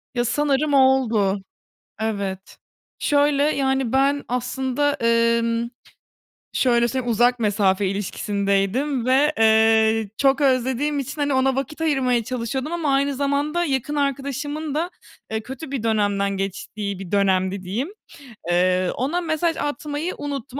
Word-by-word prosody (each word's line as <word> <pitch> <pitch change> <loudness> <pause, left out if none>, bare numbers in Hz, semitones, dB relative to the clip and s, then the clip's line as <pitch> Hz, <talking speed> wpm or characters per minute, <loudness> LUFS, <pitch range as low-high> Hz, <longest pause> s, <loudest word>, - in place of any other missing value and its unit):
Ya, 240 0 +1
sanırım 290 +3 +1
oldu. 235 -7 +3 0.6
Evet. 200 -3 -4 0.4
Şöyle: 285 0 +2
Yani, 265 -4 0
ben 280 +1 +2
aslında, 260 +3 -1
emm, 230 -1 +1 0.8
şöyle 240 -2 +3
söyleyeyim, 245 0 -2
uzak 245 +2 +3
mesafe 200 -2 +1
ilişkisindeydim 200 +6 -1
ve, 275 +4 +3
eee, 220 -1 +4
çok 275 +1 +3
özlediğim 265 +2 +1
için, 285 +3 -5
hani, 285 -1 +1
ona 260 0 +2
vakit 275 +4 -4
ayırmaya 255 -7 +1
çalışıyordum 255 +5 -3
ama 325 -5 0
aynı 280 +1 +1
zamanda 285 +5 0
yakın 280 0 -2
arkadaşımın 285 +2 -2
da, 335 +3 -1 0.4
eee, 220 0 -1
kötü 265 +5 -8
bir 265 -5 -3
dönemden 205 -3 0
geçtiği 195 +1 -4
bir 190 -3 -8
dönemdi 190 -1 +1
diyeyim. 220 - -3 0.6
Eee, 180 +1 +2
ona 290 +9 -1
mesaj 325 0 0
atmayı 290 +3 -3
unuttum 280 -2 -5
255 Hz, 125 wpm, -22 LUFS, 220-285 Hz, 0.8 s, eee